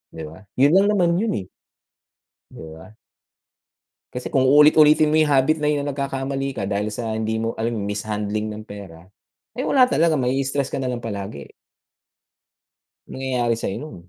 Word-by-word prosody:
di 80 - -7
ba? 80 +4 -12 0.2
Yun 140 +3 +5
lang 195 +2 +5
naman 175 -3 +2
yun 225 +2 0
eh. - - -23 1.0
Di - - -14 0.2
ba? 80 +5 -13 1.2
Kasi 125 - -6
kung 135 - +3
uulit-ulitin 150 +3 +6
mo 155 - +4
yung 155 - +2
habit 145 +3 +2
na 150 - +1
yun 145 -1 -1
nagkakamali 135 -1 -3
ka 95 - -2
dahil 100 +1 -2
sa 110 +1 -4
hindi 110 0 -2
mo 115 +1 -2
alam 115 +1 -3
mishandling 105 +1 -3
ng 105 0 -7
pera 95 -6 -11 0.5
ay 250 - -4
wala 260 -2 +5
talaga 165 0 +3
mai-stress 135 +2 -1
ka - - -2
nalang 125 -2 -2
palagi. 100 - -6 1.6
Nangyayari 125 -3 -1
sa'yo 105 -4 -4
yun, 150 +3 -9
130 Hz, 160 wpm, -22 LUFS, 105-145 Hz, 1.6 s, uulit-ulitin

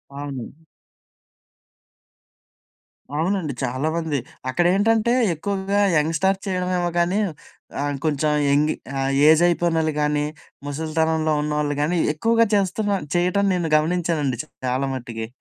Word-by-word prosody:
అవును. 140 -3 -6 2.6
అవునండి. 165 -1 -1
చాలామంది. 150 +5 -1 0.3
అక్కడేంటంటే 205 - +2 0.2
ఎక్కువగా 200 +4 -1 0.2
యంగ్‌స్టార్ 165 +6 +1
చేయడమేమో 180 -1 0
గానీ 180 +4 +1 0.6
ఆహ్, 145 0 -1
కొంచెం 150 0 +1 0.2
యంగి 150 +2 +3 0.3
ఆహ్, 135 - 0 0.2
ఏజ్ 160 +1 +6
అయిపోయినోళ్ళు 165 -2 +1
గానీ, 150 0 +1 0.4
ముసలితనంలో 160 +2 0
ఉన్నవోళ్ళు 150 -1 -1
గానీ, 165 +4 +1 0.2
ఎక్కువగా 230 +8 +3
చేస్తున్నా 200 +1 0 0.2
చేయటం 180 +3 +2
నేను 175 -3 -1
గమనించానండి 155 -5 0 0.3
చాలా 130 +2 0
మట్టికి. 115 -3 -5
160 Hz, 95 wpm, -22 LUFS, 150-180 Hz, 2.6 s, ఏజ్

